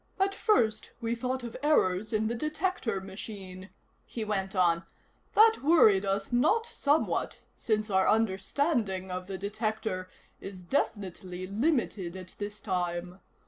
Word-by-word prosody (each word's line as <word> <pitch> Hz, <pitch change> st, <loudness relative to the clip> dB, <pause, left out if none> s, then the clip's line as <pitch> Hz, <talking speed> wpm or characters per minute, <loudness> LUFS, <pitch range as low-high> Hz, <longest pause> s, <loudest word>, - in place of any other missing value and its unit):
"At 390 Hz, +1 st, +2 dB
first 225 Hz, -, +2 dB
we 230 Hz, 0 st, -1 dB
thought 255 Hz, +2 st, -2 dB
of 235 Hz, -2 st, -6 dB
errors 215 Hz, -9 st, +2 dB
in 220 Hz, -1 st, +1 dB
the 225 Hz, -, 0 dB
detector 305 Hz, -, -1 dB
machine," 190 Hz, -1 st, -8 dB, 0.3 s
he 225 Hz, -2 st, -5 dB
went 195 Hz, -2 st, -2 dB
on. 170 Hz, -2 st, +3 dB, 0.5 s
"That 445 Hz, +1 st, +6 dB
worried 220 Hz, -, +5 dB
us 195 Hz, +2 st, -1 dB
not 315 Hz, -, +3 dB
somewhat, 300 Hz, -8 st, 0 dB, 0.2 s
since 215 Hz, -1 st, -1 dB
our 190 Hz, 0 st, +3 dB
understanding 215 Hz, -, 0 dB
of 180 Hz, 0 st, -4 dB
the 195 Hz, -1 st, -4 dB
detector 210 Hz, -2 st, -3 dB, 0.3 s
is 190 Hz, -2 st, -9 dB
definitely 185 Hz, -4 st, -2 dB
limited 205 Hz, -, 0 dB
at 185 Hz, -1 st, -10 dB
this 205 Hz, 0 st, -5 dB
time. 180 Hz, -1 st, -2 dB
210 Hz, 135 wpm, -29 LUFS, 190-240 Hz, 0.5 s, That